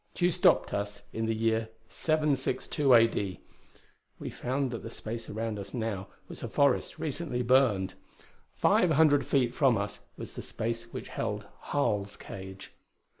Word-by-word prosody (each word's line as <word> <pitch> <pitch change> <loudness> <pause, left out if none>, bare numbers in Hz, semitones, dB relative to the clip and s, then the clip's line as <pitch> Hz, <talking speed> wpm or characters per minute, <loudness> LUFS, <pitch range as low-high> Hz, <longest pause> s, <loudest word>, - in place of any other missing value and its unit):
Tugh 175 0 +3
stopped 180 +2 +3
us 100 0 -3
in 110 0 -1
the 115 - +1
year 110 0 +1 0.2
762 150 -2 +1
A.D. 115 -6 +4 0.8
We - - -6
found 130 +1 -1
that 115 - -4
the - - -7
space 115 +1 -6
around 110 0 -3
us 100 +2 -7
now 110 -5 -2 0.2
was - - -8
a - - -3
forest 140 -2 +2
recently 145 -4 -2
burned. 120 -7 +3 0.6
Five 180 - +4
hundred 155 -2 +4
feet 125 -3 +2
from 130 -4 +4
us 100 +1 -3 0.2
was - - -7
the - - -6
space 115 +1 -4
which - - -6
held - - -3 0.2
Harl's 105 -8 0
cage. 95 0 -9
115 Hz, 150 wpm, -30 LUFS, 105-140 Hz, 0.8 s, A.D